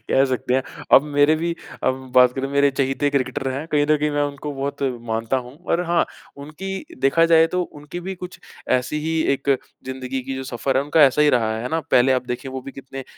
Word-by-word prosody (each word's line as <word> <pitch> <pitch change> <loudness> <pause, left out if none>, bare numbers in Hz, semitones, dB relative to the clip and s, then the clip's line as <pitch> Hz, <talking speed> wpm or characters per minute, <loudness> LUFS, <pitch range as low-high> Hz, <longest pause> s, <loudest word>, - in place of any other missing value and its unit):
कह 135 - +4
सकते 130 -1 -1
हैं। 130 - +2 0.3
अब - - +9
मेरे 145 +1 +3
भी 170 +1 -2 0.3
अब 130 0 -1
बात 125 -1 +6
करें, 135 +1 -3
मेरे 140 0 +3
चहेते 135 +1 0
क्रिकेटर 135 0 -1
हैं। 140 +4 -4
कहीं 145 0 +3
न 155 - +5
कहीं 150 0 0
मैं 145 0 0
उनको 145 +1 -4
बहुत 140 +1 -4 0.3
मानता 115 +3 0
हूँ 125 +4 -13
और 170 - +2
हाँ, 170 0 +2 0.3
उनकी 155 +7 -8 0.4
देखा 165 +5 +4
जाए 160 0 +7
तो 180 - +2
उनकी 150 +1 -8
भी 190 - -3
कुछ 180 0 -9 0.4
ऐसी 130 +4 -2
ही 160 +1 -1
एक 140 +1 -1 0.3
ज़िंदगी 130 0 -4
की 135 +1 -5
जो 130 - -4
सफ़र 130 +2 0
है, 135 - +3
उनका 150 +2 +4
ऐसा 140 +3 +3
ही 150 - +5
रहा 110 -2 0
है, 110 - -5
है 125 - -3
ना? 160 0 0
पहले 130 +2 +5
आप 125 -1 -1
देखें, 125 +3 -4
वो 130 0 -5
भी 135 +1 -9
कितने 135 -1 -9
140 Hz, 230 wpm, -22 LUFS, 130-150 Hz, 0.4 s, अब